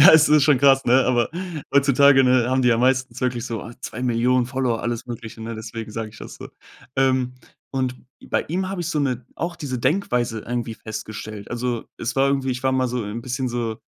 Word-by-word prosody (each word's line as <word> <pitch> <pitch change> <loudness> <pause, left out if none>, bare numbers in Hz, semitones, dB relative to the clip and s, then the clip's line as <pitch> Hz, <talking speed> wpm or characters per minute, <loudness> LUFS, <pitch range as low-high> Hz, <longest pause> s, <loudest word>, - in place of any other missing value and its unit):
ja, 185 - +10
es 160 -1 +7
ist 150 -1 +5
schon 140 -2 +5
krass, 135 0 +5
ne? 125 +2 +4
Aber 120 -2 +2 0.4
heutzutage, 140 -1 +5
ne, 125 -1 +3
haben 130 0 +2
die 125 - +4
ja 115 - +4
meistens 130 -1 +1
wirklich 125 -1 -1
so, 115 -2 -4
oh, - - -8
2.000.000 125 +1 +1
Follower, 130 -3 -1
alles 120 -1 -3
Mögliche, 115 -2 -8
ne? 115 +1 -5
Deswegen 110 0 -7
sage 110 0 -4
ich 110 - -15
das - - -9
so. - - -9 0.5
Ähm, 130 -1 +2 0.4
und 130 -2 -1 0.3
bei - - +1
ihm 185 +4 -1
habe 195 -1 -4
ich 170 - -3
so 155 - -1
'ne 130 -4 -1
auch 170 +1 -3
diese 130 -4 -4
Denkweise 125 - 0
irgendwie 120 0 -3
festgestellt. 110 -1 -7
Also, 120 -1 -2
es 115 - -3
war 135 +1 +4
irgendwie 135 -1 0
ich 125 +1 -4
war 130 - +3
mal 130 -1 +1
so 125 +1 -2
'n, 105 +3 -5
bisschen 125 +1 -2
so 120 -2 -2
125 Hz, 215 wpm, -22 LUFS, 115-135 Hz, 0.5 s, ja